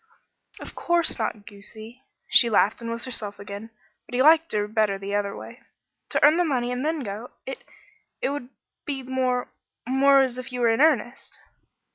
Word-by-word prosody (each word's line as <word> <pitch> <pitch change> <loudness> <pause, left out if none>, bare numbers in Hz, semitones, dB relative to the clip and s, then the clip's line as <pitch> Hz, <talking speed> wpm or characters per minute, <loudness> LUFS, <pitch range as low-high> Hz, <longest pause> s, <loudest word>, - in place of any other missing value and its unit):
"Of - - -9
course 345 -5 0
not 215 -2 -3
goosey." 220 +4 -11 0.3
She 235 - +5
laughed 215 +1 +2
and 230 - -5
was 230 0 -2
herself 210 -5 -6
again, 200 +2 -8 0.4
but - - -6
he 255 - +3
liked 320 +2 +5
her 210 -1 0
better 215 -2 +1
the 195 +1 -6
other 205 -1 -1
way. - - -11 0.5
"To - - +3
earn 305 +3 +6
the 355 - +3
money 250 -6 0
and 250 +1 -2
then 315 0 -1
go. 215 +1 -6 0.2
It 265 - -7 0.6
it - - 0
would 280 -4 -5 0.3
be 275 -2 -4
more 255 -1 -1 0.4
more 275 +1 +5
as 255 -1 -3
if 255 - -7
you 250 0 -4
were 235 - +4
in 225 - +1
earnest." 270 -5 +1
245 Hz, 185 wpm, -25 LUFS, 215-270 Hz, 0.6 s, earn